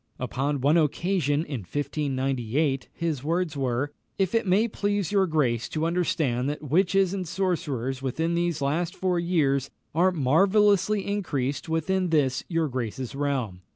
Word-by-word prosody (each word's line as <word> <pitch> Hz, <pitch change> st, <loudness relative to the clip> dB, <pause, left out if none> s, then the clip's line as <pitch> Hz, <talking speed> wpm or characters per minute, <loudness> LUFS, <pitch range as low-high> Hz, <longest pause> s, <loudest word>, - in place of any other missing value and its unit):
Upon 135 Hz, +2 st, -2 dB
one 145 Hz, +5 st, +4 dB
occasion, 160 Hz, -1 st, +1 dB
in 140 Hz, -4 st, -4 dB
1598, 135 Hz, -, -1 dB
his 160 Hz, -6 st, -3 dB
words 165 Hz, 0 st, -1 dB
were, 135 Hz, +1 st, -1 dB, 0.3 s
"It 200 Hz, +3 st, +1 dB
may 200 Hz, +5 st, +3 dB
please 205 Hz, -3 st, -1 dB
your 195 Hz, -2 st, +3 dB
grace 130 Hz, -8 st, 0 dB
to 155 Hz, 0 st, -1 dB
understand 155 Hz, -7 st, 0 dB
that 150 Hz, +1 st, -5 dB
witches 185 Hz, +5 st, +2 dB
and 185 Hz, -3 st, -3 dB
sorcerers 150 Hz, -9 st, -2 dB
within 160 Hz, +6 st, -1 dB
these 170 Hz, -3 st, 0 dB
last 165 Hz, +5 st, -1 dB
four 180 Hz, -2 st, 0 dB
years 145 Hz, -6 st, +1 dB, 0.2 s
are 180 Hz, +4 st, +3 dB
marvellously 195 Hz, +7 st, +3 dB
increased 150 Hz, -9 st, -2 dB
within 180 Hz, +3 st, 0 dB
this 140 Hz, -5 st, +1 dB
your 165 Hz, -2 st, +1 dB
grace's 125 Hz, -1 st, -4 dB
realm. 135 Hz, -10 st, -2 dB
155 Hz, 140 wpm, -26 LUFS, 135-180 Hz, 0.3 s, one